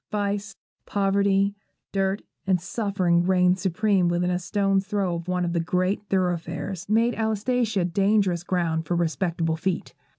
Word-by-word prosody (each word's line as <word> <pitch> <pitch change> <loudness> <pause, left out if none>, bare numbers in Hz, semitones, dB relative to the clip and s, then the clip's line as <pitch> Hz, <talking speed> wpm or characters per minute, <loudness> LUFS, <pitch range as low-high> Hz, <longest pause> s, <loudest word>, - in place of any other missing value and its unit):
Vice, 205 -1 -2 0.3
poverty, 200 0 +2 0.4
dirt, 195 0 0 0.2
and 185 -2 +3
suffering 185 -2 0
reigned 180 0 +3
supreme 195 0 +2
within 175 +1 +1
a 180 - 0
stone's 195 +1 0
throw 195 -3 0
of 170 0 -5
one 180 -1 0
of 170 - -2
the 170 - +1
great 185 +4 0
thoroughfares, 180 0 -2
and 215 - +2
made 235 +2 +3
Alsatia 220 -2 0
dangerous 195 -1 +2
ground 165 -3 -1
for 175 - 0
respectable 165 -1 0
feet. 185 +1 -2
190 Hz, 145 wpm, -25 LUFS, 175-200 Hz, 0.4 s, and